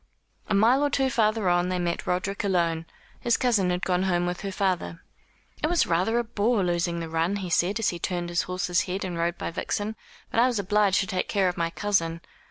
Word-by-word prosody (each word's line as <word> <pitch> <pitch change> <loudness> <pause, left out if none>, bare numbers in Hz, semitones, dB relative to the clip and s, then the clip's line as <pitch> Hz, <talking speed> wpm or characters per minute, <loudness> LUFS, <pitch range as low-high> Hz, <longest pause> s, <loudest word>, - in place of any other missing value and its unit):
A - - +2
mile 235 +7 +4
or 290 - +2
two 270 -2 +1
farther 215 -4 +1
on 175 0 +2
they 185 - 0
met 175 -1 -2
Roderick 190 +3 -1
alone. 170 -4 0 0.3
His 235 - +2
cousin 220 -8 +2
had 180 0 -1
gone 180 -1 +1
home 175 -2 +1
with 180 0 -3
her 195 -1 -4
father. 185 -3 -2 0.6
"It 305 - +2
was 345 0 +2
rather 185 +7 +1
a 240 - +2
bore 220 -1 +1
losing 175 -1 0
the 165 - -4
run," 165 +4 0
he 190 -3 -4
said, 180 +5 +2
as 225 - +1
he 175 - -5
turned 175 0 -2
his 175 0 +1
horse's 180 -1 0
head 190 +2 -3
and 180 -2 -4
rode 170 +1 -1
by - - -4
Vixen, 205 +5 -3 0.4
"but - - +1
I 245 - +6
was 245 -3 -1
obliged 200 0 +2
to - - -1
take 185 -1 -2
care 195 -3 +2
of 180 - -4
my 170 0 -1
cousin." 170 -3 -1
185 Hz, 230 wpm, -26 LUFS, 175-210 Hz, 0.6 s, I